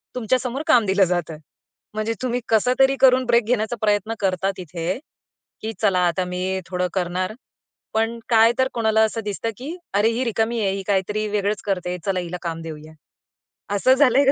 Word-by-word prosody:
तुमच्यासमोर 250 Hz, +3 st, -1 dB
काम 240 Hz, -8 st, +5 dB
दिलं 195 Hz, 0 st, +3 dB
जातं. 170 Hz, -3 st, -2 dB, 0.6 s
म्हणजे 215 Hz, +1 st, -1 dB
तुम्ही 250 Hz, -1 st, -1 dB
कसं 225 Hz, +3 st, +3 dB
तरी 270 Hz, 0 st, +5 dB
करून 255 Hz, -1 st, +5 dB
ब्रेक 235 Hz, -1 st, +3 dB
घेण्याचा 235 Hz, 0 st, 0 dB
प्रयत्न 210 Hz, +1 st, +1 dB
करता 190 Hz, 0 st, 0 dB
तिथे, 175 Hz, -, -4 dB, 0.6 s
की 220 Hz, +1 st, -4 dB
चला 195 Hz, -4 st, +3 dB
आता 180 Hz, +2 st, 0 dB
मी 185 Hz, +1 st, -2 dB
थोडं 180 Hz, 0 st, -1 dB
करणार, 185 Hz, +2 st, -1 dB, 0.6 s
पण 225 Hz, +1 st, 0 dB
काय 225 Hz, 0 st, +6 dB
तर 260 Hz, -, +4 dB
कोणाला 220 Hz, -1 st, +2 dB
असं 225 Hz, +1 st, -1 dB
दिसतं 210 Hz, +2 st, -3 dB
की 295 Hz, +7 st, -6 dB, 0.2 s
"अरे 210 Hz, +3 st, +3 dB
ही 245 Hz, +3 st, -1 dB
रिकामी 230 Hz, 0 st, 0 dB
आहे, 195 Hz, -2 st, +1 dB
ही 195 Hz, -, -5 dB
काही 195 Hz, -2 st, +3 dB
तरी 215 Hz, +1 st, -1 dB
वेगळंच 205 Hz, 0 st, -1 dB
करतेय, 180 Hz, -2 st, -2 dB
चला 190 Hz, -2 st, 0 dB
हिला 180 Hz, 0 st, -5 dB
काम 165 Hz, -1 st, -4 dB
देऊया." 155 Hz, -1 st, -9 dB, 0.8 s
असं 255 Hz, +6 st, +4 dB
झालंय 270 Hz, 0 st, +4 dB
का 275 Hz, -, +6 dB
210 Hz, 180 wpm, -22 LUFS, 185-235 Hz, 0.8 s, काय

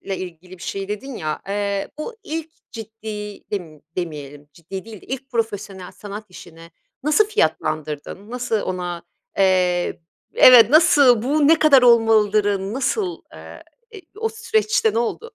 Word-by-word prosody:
ilgili 180 Hz, 0 st, -9 dB
bir -, -, -11 dB
şey 195 Hz, 0 st, -4 dB
dedin 230 Hz, +5 st, -6 dB
ya, 155 Hz, -1 st, -4 dB
eee, 200 Hz, 0 st, -2 dB
bu 455 Hz, +10 st, -6 dB
ilk 320 Hz, 0 st, -5 dB, 0.2 s
ciddi 215 Hz, -2 st, -8 dB
dem 165 Hz, -7 st, -6 dB
demeyelim 145 Hz, -4 st, -6 dB
ciddi 185 Hz, +5 st, -8 dB
değil 220 Hz, -4 st, -11 dB
de -, -, -17 dB
ilk 270 Hz, +1 st, -6 dB
profesyonel 205 Hz, -5 st, -4 dB
sanat 210 Hz, +1 st, -9 dB
işine 165 Hz, -2 st, -14 dB, 0.3 s
nasıl 305 Hz, +8 st, +3 dB
fiyatlandırdın? 155 Hz, -, -2 dB
Nasıl 240 Hz, -3 st, -2 dB
ona, 180 Hz, -2 st, -4 dB, 0.3 s
eee, 180 Hz, -3 st, +2 dB, 0.3 s
b -, -, -8 dB
evet, 240 Hz, -3 st, +9 dB
nasıl 285 Hz, -7 st, +5 dB
bu 290 Hz, +3 st, +2 dB
ne 325 Hz, 0 st, +5 dB
kadar 280 Hz, -4 st, +6 dB
olmalıdırı, 215 Hz, -4 st, +3 dB
nasıl, 340 Hz, -, -2 dB
eee, -, -, -12 dB, 0.3 s
i 385 Hz, -, -10 dB, 0.2 s
o 450 Hz, 0 st, -1 dB
süreçte 435 Hz, -, 0 dB
ne 230 Hz, -, +1 dB
oldu? 460 Hz, -, -3 dB
210 Hz, 145 wpm, -21 LUFS, 185-270 Hz, 0.3 s, evet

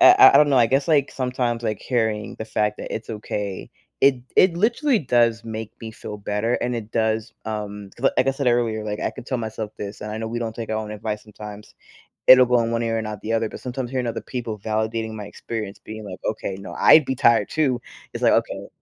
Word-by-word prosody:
I 360 Hz, +1 st, +9 dB
I -, -, +10 dB
I -, -, +9 dB
don't 150 Hz, -1 st, +6 dB
know, 135 Hz, -, +3 dB
I 115 Hz, -, +6 dB
guess 135 Hz, +6 st, +1 dB
like, 145 Hz, -3 st, +3 dB
sometimes 125 Hz, -2 st, -2 dB
like 110 Hz, -3 st, -2 dB
hearing 110 Hz, -4 st, -1 dB
the 110 Hz, -, -5 dB
fact 105 Hz, -1 st, 0 dB
that -, -, -5 dB
it's 110 Hz, -, -6 dB
okay, 105 Hz, -2 st, -4 dB, 0.3 s
it 135 Hz, -1 st, +5 dB, 0.2 s
it 180 Hz, -2 st, +5 dB
literally 235 Hz, -, +2 dB
does 120 Hz, -4 st, +2 dB
make 110 Hz, -1 st, -6 dB
me 110 Hz, -1 st, -6 dB
feel 105 Hz, -1 st, -8 dB
better 105 Hz, +4 st, -1 dB
and 125 Hz, 0 st, -1 dB
it 110 Hz, -1 st, -6 dB
does, 110 Hz, 0 st, 0 dB
um, 105 Hz, -2 st, -5 dB
'cause, 135 Hz, +3 st, +2 dB
like -, -, +3 dB
I -, -, +4 dB
said 135 Hz, -1 st, -3 dB
earlier, 115 Hz, -3 st, +1 dB
like 105 Hz, 0 st, -4 dB
I -, -, 0 dB
could -, -, -11 dB
tell 130 Hz, -, -1 dB
myself 110 Hz, -1 st, -4 dB
this, 100 Hz, 0 st, -7 dB
and 105 Hz, 0 st, -5 dB
I 110 Hz, -, -4 dB
know 110 Hz, 0 st, -3 dB
we 120 Hz, +1 st, -3 dB
don't 115 Hz, -2 st, -3 dB
take 115 Hz, -2 st, -6 dB
our 110 Hz, -, 0 dB
own 110 Hz, -1 st, -4 dB
advice 105 Hz, 0 st, -4 dB
sometimes, 105 Hz, -1 st, -11 dB, 0.5 s
it'll 130 Hz, 0 st, +10 dB
go 125 Hz, 0 st, +4 dB
in 115 Hz, 0 st, -1 dB
one 115 Hz, 0 st, 0 dB
ear 115 Hz, 0 st, 0 dB
and 110 Hz, -, -2 dB
not 105 Hz, -2 st, -6 dB
the 115 Hz, +1 st, -2 dB
other, 115 Hz, 0 st, +1 dB
but -, -, -9 dB
sometimes 125 Hz, -1 st, -4 dB
hearing 125 Hz, -2 st, -1 dB
other 115 Hz, -, -3 dB
people 115 Hz, -4 st, -5 dB
validating 110 Hz, +1 st, -2 dB
my 105 Hz, -1 st, -6 dB
experience 105 Hz, -1 st, -6 dB
being 110 Hz, 0 st, -9 dB
like, 95 Hz, -1 st, -8 dB
"Okay, 100 Hz, -3 st, -2 dB
no, 100 Hz, -, -8 dB
I'd 155 Hz, -3 st, +6 dB
be 130 Hz, -, -1 dB
tired 115 Hz, -4 st, +4 dB
too," 135 Hz, -6 st, +1 dB, 0.3 s
it's -, -, -5 dB
like, -, -, +5 dB
"Okay." -, -, -1 dB
115 Hz, 245 wpm, -23 LUFS, 105-125 Hz, 0.5 s, I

